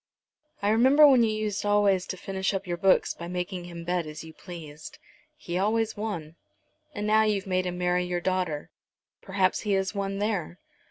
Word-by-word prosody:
I 205 - +2
remember 260 +7 +6
when 265 -4 +6
you 225 - +3
used 215 -1 -2
always 205 -3 +2
to 185 - -5
finish 190 +1 -2
up 195 +1 -3
your 175 -1 -2
books 190 +1 +3
by 170 - -8
making 180 0 -4
him 170 -1 -8
bet 175 -1 -1
as 155 +1 -8
you 160 0 -11
pleased." 155 -5 -10 0.4
"He 175 +1 -4
always 220 +2 +1
won." 170 -7 -5 0.6
"And 205 - -3
now 215 +1 +4
you've 210 -3 +1
made 185 -1 0
him 180 0 -4
marry 180 0 +1
your 180 0 -2
daughter. 180 -5 -2 0.5
Perhaps 190 -1 +1
he 210 -2 -1
has 190 0 0
won 195 -1 -3
there. 200 -5 -2
190 Hz, 185 wpm, -27 LUFS, 175-205 Hz, 0.6 s, remember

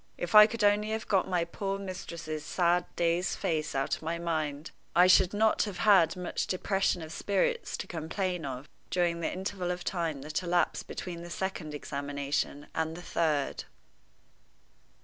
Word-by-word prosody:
If 175 - -4
I 210 0 +10
could 225 -1 -3
only 205 +1 +3
have 220 0 -3
got 195 -3 +2
my 180 -2 +1
poor 195 +3 -3
mistress's 170 -5 -6
sad, 175 0 +2
dazed 170 +2 +1
face 155 -6 -1
out 135 0 +1
of - - -13
my 165 +1 -2
mind, 155 -3 -2 0.2
I 180 +1 +7
should 185 0 +6
not 215 +1 +3
have 200 -4 -6
had 195 -6 +5
much 180 -1 -3
depression 190 -2 0
of 160 - -8
spirits 205 - 0
to - - -5
complain 175 +2 -3
of 135 0 -5 0.2
during 175 -2 +1
the 165 - -1
interval 190 -1 -3
of 180 0 -3
time 165 -6 -2
that 155 +3 -2
elapsed 175 -1 0
between 175 -2 -6
the 175 - -8
second 170 -5 -4
examination 140 0 -3
and 160 0 -2
the 175 - -9
third. 155 -6 0
175 Hz, 170 wpm, -30 LUFS, 160-190 Hz, 0.2 s, I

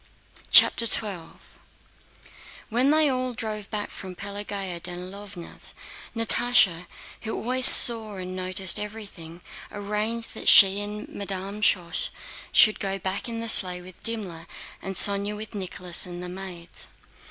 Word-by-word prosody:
CHAPTER 230 - +5
XII 195 -8 -1 1.3
When 245 +4 0
they 310 0 +3
all 255 -2 -3
drove 215 -2 -7
back 210 -1 -5
from 185 -1 -10
Pelagéya 200 -2 -7
Danílovna's, 180 +1 -8 0.4
Natásha, 230 -6 +4 0.3
who 220 - -6
always 255 +2 +2
saw 220 -3 +6
and 185 -1 -8
noticed 185 0 0
everything, 200 -6 -10 0.3
arranged 210 +3 -5
that - - -2
she 195 +1 +7
and 210 +1 -7
Madame 200 +1 -7
Schoss 180 -5 -1 0.4
should 215 - +4
go 195 -1 -3
back 190 +5 -5
in 230 0 -6
the 230 - -4
sleigh 180 -4 +6
with 185 0 -14
Dimmler, 190 -8 -6 0.3
and 195 0 -7
Sónya 200 +2 +2
with 215 0 -10
Nicholas 180 -3 -2
and 175 0 -9
the 180 - -6
maids. 180 -2 -8
200 Hz, 130 wpm, -23 LUFS, 185-220 Hz, 1.3 s, she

